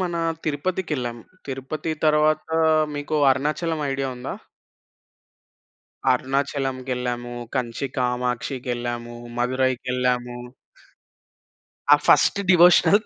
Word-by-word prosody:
మన 175 -2 -1 0.3
తిరుపతికెళ్ళాం, 150 -5 -2 0.3
తిరుపతి 135 +4 -4
తరువాత 155 +1 +3 0.5
మీకు 145 +1 -4 0.2
అరుణాచలం 150 +4 0
ఐడియా 135 0 -2
ఉందా? 125 - -5 1.8
అరుణాచలంకెళ్ళాము, 130 -2 -1 0.2
కంచి 125 +1 -2
కామాక్షికెళ్ళాము, 125 -1 -2 0.2
మధురైకెళ్ళాము. 125 -1 0 1.5
ఆ - - +12
ఫస్ట్ - - +5
డివోషనల్, 180 +3 +6
130 Hz, 70 wpm, -23 LUFS, 125-150 Hz, 1.8 s, ఆ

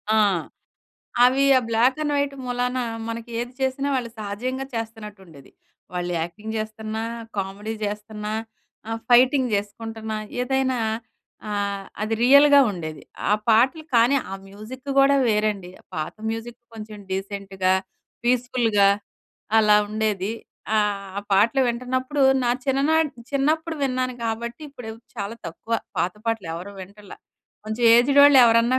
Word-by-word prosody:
ఆ! - - +4 1.1
అవి 260 +2 +4
ఆ - - 0
బ్లాక్ 235 +5 +3
అండ్ 295 -1 -1
వైట్ 285 -1 0
మూలాన, 250 +1 -1 0.3
మనకి 230 +1 -6
ఏది 240 +1 -5
చేసినా 265 +1 0
వాళ్ళు 245 -3 -2
సహజంగా 240 +6 -3
చేస్తున్నట్టు 220 -3 -6
ఉండేది. 140 -5 -16 0.4
వాళ్ళు 180 0 -2
యాక్టింగ్ 210 +7 -5
చేస్తున్నా, 220 0 -4 0.4
కామెడీ 200 +3 -4
చేస్తున్నా, 210 +1 -5 0.6
ఆహ్, 225 0 -3
ఫైటింగ్ 255 +2 +5
చేసుకుంటున్నా, 220 +2 -4 0.2
ఏదైనా 260 0 +1 0.7
ఆహ్, 200 -1 -2 0.2
అది 215 +1 0
రియల్‌గా 280 +2 +7
ఉండేది. 155 -4 -6 0.3
ఆ - - +5 0.2
పాటలు 255 +8 +4
కానీ, 240 +4 +5
ఆ - - -4
మ్యూజిక్ 215 +7 -10
కూడా 275 +1 +5
వేరండి. 210 -4 0 0.2
పాత 155 -2 -3 0.2
మ్యూజిక్ 225 +1 -6 0.2
కొంచెం 215 -1 -9
డీసెంట్‌గా, 195 -1 -1 0.5
పీస్‌ఫుల్‌గా 240 -4 +3 0.7
అలా 210 -1 +6
ఉండేది. 210 -2 -1 0.5
ఆహ్, 200 -2 -1
పాటలు 220 +7 +4
వింటున్నప్పుడు, 255 +4 -1 0.2
నా 240 - +2 0.2
చిన్ననాటి 290 +3 +2 0.2
చిన్నప్పుడు 315 +4 0
విన్నాను 255 -1 -1
కాబట్టి, 235 +4 -4
ఇప్పుడు 245 -5 -8 0.2
చాలా 205 +1 -4
తక్కువ. 215 +7 -8 0.3
పాత 175 +2 0
పాటలు 225 -6 -1
ఎవరు 180 +4 -7
వింటల్ల. 200 +2 -13 0.5
కొంచెం 220 +2 -2
ఏజ్డ్ 275 +4 +5
వాళ్ళు 285 -1 +8
ఎవరన్నా 230 +2 +4
225 Hz, 125 wpm, -23 LUFS, 205-255 Hz, 1.1 s, వాళ్ళు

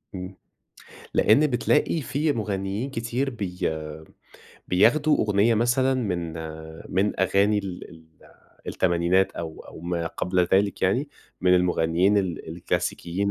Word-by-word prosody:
إمم. 95 +1 -7 0.8
لإن 140 +8 +5
بتلاقي 150 +5 +1
فيه 145 +2 0
مغنيين 105 +1 -3
كتير 125 +2 -2
بي 95 -7 -6 1.1
بياخدوا 145 - +4
أغنية 105 +2 +3
مثلًا 120 +4 +2
من 90 -9 -2 0.6
من 95 +2 +1
أغاني 100 +2 +3
ال 95 -3 -6
ال 80 -1 -15 0.6
التمانينات 90 +1 +1
أو 80 -2 -7
أو - - -12
ما 85 -1 -2
قبل 90 +1 0
ذلك 100 0 +2
يعني، 120 +10 +1 0.3
من 90 0 +4
المغنيين 90 +2 +2
ال 90 -4 -3
الكلاسيكيين 90 +3 -2
100 Hz, 115 wpm, -25 LUFS, 90-115 Hz, 1.1 s, لإن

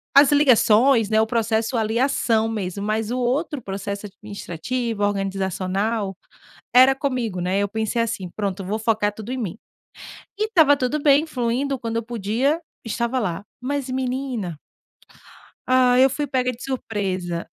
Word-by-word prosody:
as 280 +1 +7
ligações, 250 -4 +5
né, 220 0 +3
o 220 - +1
processo 225 +1 0
ali, 220 +1 0
a 260 - +4
ação 225 -5 +1
mesmo. 200 -3 -4
Mas, 215 +1 -1
o 250 - -1
outro 270 +4 -1
processo 200 0 -5
administrativo, 205 +3 -4
organizacional. 195 +1 -1 0.6
Era 260 +2 +7
comigo, 250 -8 -2
né. 185 +2 0
Eu 200 - +1
pensei 220 +2 -1
assim: 215 -5 -3
"Pronto, 200 -2 -3
vou 210 +4 -2
focar 215 -2 +1
tudo 220 +3 -8
em 260 - -2
mim". 215 -6 -4 0.8
E 425 - +1
estava 320 -10 +5
tudo 275 +3 -1
bem, 285 +1 +4
fluindo. 260 0 -1
Quando 230 -2 -3
eu 230 - -2
podia, 240 - -1 0.2
estava 235 +3 -1
lá. 190 -4 -3 0.2
Mas, 275 +1 -2
menina 255 - -3 1.1
hã 255 -1 +4
eu 265 +1 +6
fui 290 +3 -2
pega 255 -1 0
de 245 0 -11
surpresa. 190 -9 -3
230 Hz, 155 wpm, -22 LUFS, 205-255 Hz, 1.1 s, as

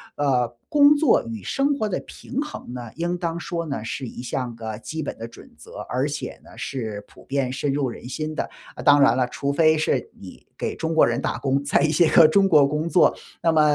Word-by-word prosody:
呃， 130 -4 +1 0.2
工 290 0 +6
作 290 -3 +3
与 110 -4 -6
生 280 - 0
活 215 - -1
的 195 - -2
平 265 - -7
衡 300 - -7
呢， 120 -2 -7
应 175 +2 -2
当 170 -1 -3
说 170 -1 -4
呢， 140 -7 -4
是 130 +3 -4
一 120 - -8
项 125 -1 -3
个 110 -2 -6
基 160 +6 -5
本 - - -5
的 115 - -6
准 - - -15
则， - - -13
而 130 +3 0
且 145 - -5
呢 - - -16
是 110 -6 -5
普 - - -18
遍 135 -2 -1
深 145 0 -1
入 135 -2 0
人 120 - -9
心 155 +3 -4
的。 - - -3 0.3
啊， - - -7
当 145 0 +6
然 125 -4 +5
了， 125 -1 +1
除 140 +3 -3
非 155 +1 +4
是 150 -4 0
你 95 - -12
给 - - -3
中 160 0 -2
国 160 - +6
人 120 +2 -1
打 - - -2
工， 135 0 0
在 140 - +2
一 155 - +3
些 160 +1 +4
个 165 - +7
中 195 +5 +4
国 150 -5 +6
工 150 +3 -2
作， 180 - +4 0.3
那 165 - +3
么 160 -1 +4
145 Hz, 255 characters per minute, -23 LUFS, 125-165 Hz, 0.3 s, 个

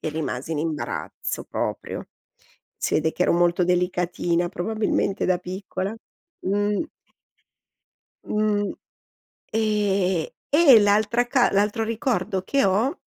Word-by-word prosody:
e - - -3
rimasi 155 -1 -3
in 150 - -2
imbarazzo 155 -1 -4
proprio. - - -4 0.7
Si - - -2
vede 160 +1 +2
che 180 - -1
ero - - +3
molto 175 +1 +3
delicatina, 175 -1 0
probabilmente 210 +1 -1
da 180 -1 +2
piccola. 185 +2 -5 0.5
Mh. 205 +4 +1 1.4
Mh, 210 -1 0 0.8
ehm, 200 -5 +1 0.3
e 290 -8 +8
l'altra 215 +4 +3
ca 245 -1 +3
l'altro 210 +3 +1
ricordo 225 -4 -1
che 275 +4 +2
ho 215 - +2
195 Hz, 110 wpm, -24 LUFS, 175-215 Hz, 1.4 s, e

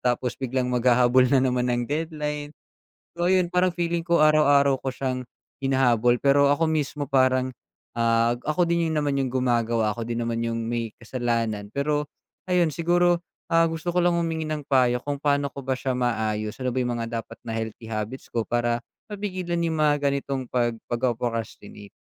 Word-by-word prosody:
tapos 125 0 -1
biglang 130 -1 -1
maghahabol 125 +1 +4
na 140 - +4
naman 125 -1 +1
ng 120 0 0
deadline. 150 0 -3 0.7
So 175 +1 0
ayun, 185 -1 +2
parang 180 +1 +3
feeling 170 -1 -1
ko 170 0 +2
araw-araw 145 -3 +4
ko 135 - -2
siyang 130 0 -3 0.4
hinahabol 125 -3 +3
pero 140 +2 +4
ako 145 +3 +2
mismo 150 -2 -1
parang, 130 -2 +2 0.4
ah, 115 0 +2 0.2
ako 175 +3 +2
din 170 -1 +1
'yon 160 - -1
naman 145 -1 0
yung 130 - -1
gumagawa, 120 -4 +1
ako 115 +1 -6
din 120 0 -2
naman 115 0 -2
yung 115 0 -2
may 115 0 -2
kasalanan. 115 -4 -2
Pero 145 +3 -1 0.4
ayun 175 -4 +2
siguro, 175 +2 +2 0.3
ah, 165 0 +4
gusto 165 +1 -3
ko 175 - -1
lang 175 0 +3
humingi 165 -2 -1
ng 155 -1 -3
payo 125 -3 +3
kung 145 +1 -3
pa'no 140 -1 +1
ko 140 0 -9
ba 135 - +1
siya 130 0 -2
maaayos, 110 -3 -1
ano 130 - 0
ba 125 - -4
yung 120 - -1
mga 115 0 -3
dapat 115 - -8
na 115 -1 -4
healthy 110 0 -6
habits 110 +4 -5
ko 115 -2 -2
para 120 0 0 0.3
mapigilan 185 -4 -3
yung 165 - -1
mga 150 -2 +2
ganitong 140 -1 -1
pag 120 -2 -1
pagpo-procrastinate? 115 -4 -3
130 Hz, 175 wpm, -25 LUFS, 120-155 Hz, 0.7 s, maghahabol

